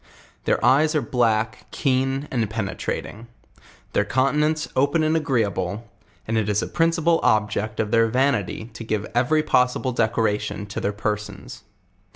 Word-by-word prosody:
Their -, -, +1 dB
eyes 155 Hz, +4 st, +4 dB
are 150 Hz, -, +2 dB
blsrk, 115 Hz, -3 st, +1 dB
keen 135 Hz, +1 st, 0 dB
and 115 Hz, -5 st, 0 dB
penetrating; 110 Hz, +1 st, -4 dB, 0.7 s
their -, -, +3 dB
countenance 150 Hz, +7 st, +1 dB
open 145 Hz, +4 st, +2 dB
and 155 Hz, +1 st, +2 dB
agreeable, 115 Hz, -, -1 dB, 0.4 s
and 110 Hz, 0 st, +1 dB
it 105 Hz, -1 st, -1 dB
is 105 Hz, 0 st, +1 dB
a -, -, -3 dB
principal 165 Hz, 0 st, +2 dB
object 110 Hz, 0 st, +1 dB
of 105 Hz, -1 st, -1 dB
their 115 Hz, -1 st, +4 dB
vanity 115 Hz, -3 st, 0 dB
to 115 Hz, -, -8 dB
give 110 Hz, -2 st, -2 dB
every 130 Hz, +6 st, +2 dB
pos 125 Hz, -4 st, +3 dB
sible 130 Hz, -2 st, -3 dB
decoration 105 Hz, -3 st, 0 dB
to 100 Hz, -, -5 dB
their 100 Hz, -, 0 dB
persons. 105 Hz, 0 st, -5 dB
115 Hz, 150 wpm, -23 LUFS, 105-140 Hz, 0.7 s, eyes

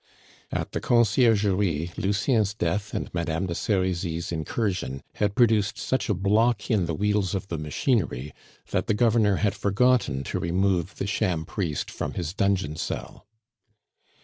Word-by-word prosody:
At -, -, -3 dB
the -, -, -3 dB
Conciergerie 105 Hz, -, +2 dB
Lucien's 105 Hz, +1 st, +1 dB
death 100 Hz, +2 st, -2 dB
and -, -, -4 dB
Madame 85 Hz, +1 st, -1 dB
de 85 Hz, -, -3 dB
Serizy's 90 Hz, -4 st, -1 dB
incursion 80 Hz, -, -2 dB
had 105 Hz, -1 st, 0 dB
produced 110 Hz, -4 st, +3 dB
such 130 Hz, -2 st, -1 dB
a 105 Hz, -, +2 dB
block 105 Hz, +5 st, +2 dB
in 100 Hz, -6 st, +2 dB
the 80 Hz, -, -2 dB
wheels 105 Hz, 0 st, 0 dB
of 95 Hz, 0 st, -4 dB
the 85 Hz, -, -3 dB
machinery 75 Hz, -, -1 dB, 0.4 s
that -, -, 0 dB
the 110 Hz, -, +2 dB
Governor 110 Hz, -3 st, +3 dB
had 100 Hz, +1 st, +1 dB
forgotten 105 Hz, -, +2 dB
to -, -, -3 dB
remove 90 Hz, +2 st, 0 dB
the -, -, -3 dB
sham 95 Hz, -5 st, 0 dB
priest 85 Hz, -5 st, -3 dB
from -, -, -4 dB
his 85 Hz, -1 st, -3 dB
dungeon 95 Hz, -7 st, 0 dB
cell. 85 Hz, -, -5 dB
100 Hz, 145 wpm, -26 LUFS, 85-105 Hz, 0.4 s, produced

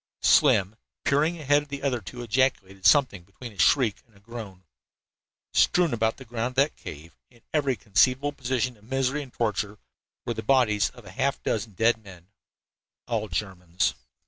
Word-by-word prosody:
Slim, 100 Hz, +3 st, +4 dB, 0.3 s
peering 155 Hz, +5 st, +2 dB
ahead 145 Hz, 0 st, +3 dB
of 145 Hz, -, -14 dB
the 140 Hz, 0 st, -6 dB
other 130 Hz, -4 st, 0 dB
two, 120 Hz, +7 st, -8 dB
ejaculated 110 Hz, -6 st, +1 dB
something 130 Hz, -, +4 dB
between 115 Hz, +6 st, -11 dB
a 100 Hz, -, -18 dB
shriek 115 Hz, -1 st, +3 dB
and 110 Hz, -4 st, -24 dB
a -, -, -20 dB
groan. 100 Hz, -4 st, -9 dB, 0.9 s
Strewn 175 Hz, -5 st, +3 dB
about 110 Hz, -1 st, 0 dB
the 130 Hz, -, -11 dB
ground 120 Hz, +1 st, -3 dB
of -, -, -28 dB
that 140 Hz, +3 st, +2 dB
cave, 80 Hz, +2 st, -10 dB
in 120 Hz, -2 st, -23 dB
every 140 Hz, -4 st, +1 dB
conceivable 130 Hz, +8 st, +2 dB
position 130 Hz, -3 st, -2 dB
of 105 Hz, -, -24 dB
misery 135 Hz, +3 st, -1 dB
and 135 Hz, -3 st, -10 dB
torture, 105 Hz, -3 st, -2 dB, 0.5 s
were -, -, -1 dB
the -, -, -5 dB
bodies 105 Hz, -4 st, +3 dB
of 120 Hz, -, -14 dB
half 135 Hz, +9 st, -1 dB
a -, -, -45 dB
dozen 110 Hz, -1 st, -2 dB
dead 110 Hz, +3 st, +2 dB
men, 90 Hz, -2 st, -14 dB, 0.8 s
all 110 Hz, -3 st, -1 dB
Germans. 90 Hz, -7 st, -2 dB
120 Hz, 170 wpm, -26 LUFS, 100-135 Hz, 0.9 s, Slim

